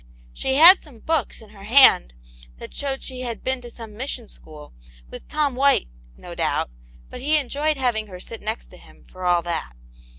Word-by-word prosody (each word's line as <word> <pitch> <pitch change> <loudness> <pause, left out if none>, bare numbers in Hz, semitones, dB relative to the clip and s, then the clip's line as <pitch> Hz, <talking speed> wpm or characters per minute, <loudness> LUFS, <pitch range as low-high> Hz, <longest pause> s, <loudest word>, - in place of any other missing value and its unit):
She 265 - -2
had 345 +6 +9
some 285 -7 -15
books 320 +4 -2
in 215 -2 -16
her 200 -2 -13
hand, 220 - +6 0.4
that - - -11
showed 270 -1 -4
she 255 -1 -6
had 235 -3 -6
been 260 -1 -2
to 240 - -10
some 225 -3 -11
mission 245 -1 -5
school, 150 - -14 0.4
with - - -11
Tom 300 -3 -1
White, 275 - +2 0.3
no 65 - -10
doubt - - -1 0.4
but - - -8
he 300 +3 +2
enjoyed 295 +2 -1
having 235 -5 -1
her 180 -2 -10
sit 225 +5 -9
next 220 +2 -5
to - - -13
him, - - -19
for 185 0 -9
all 175 -1 +2
that. 165 - -4
245 Hz, 195 wpm, -22 LUFS, 205-280 Hz, 0.4 s, had